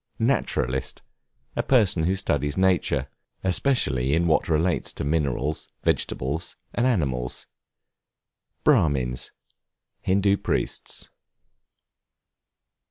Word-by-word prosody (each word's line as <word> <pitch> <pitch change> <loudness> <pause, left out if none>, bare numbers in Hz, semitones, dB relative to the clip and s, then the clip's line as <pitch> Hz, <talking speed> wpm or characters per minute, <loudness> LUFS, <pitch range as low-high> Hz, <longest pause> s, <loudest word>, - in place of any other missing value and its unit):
Naturalist, 65 +1 -1 0.5
a - - +1
person 100 -10 +3
who 95 +3 +2
studies 75 -7 -1
nature, 90 -7 +2 0.4
especially 80 - +2
in 85 +1 +2
what 80 0 +2
relates 80 +2 +1
to - - -4
minerals, 70 -1 -1
vegetables, 70 +6 -1 0.2
and 120 +2 +2
animals. 65 - -1 1.2
Brahmins, 65 -5 +2 0.7
Hindoo 100 +1 +2
priests. - - -2
80 Hz, 85 wpm, -25 LUFS, 70-95 Hz, 1.2 s, person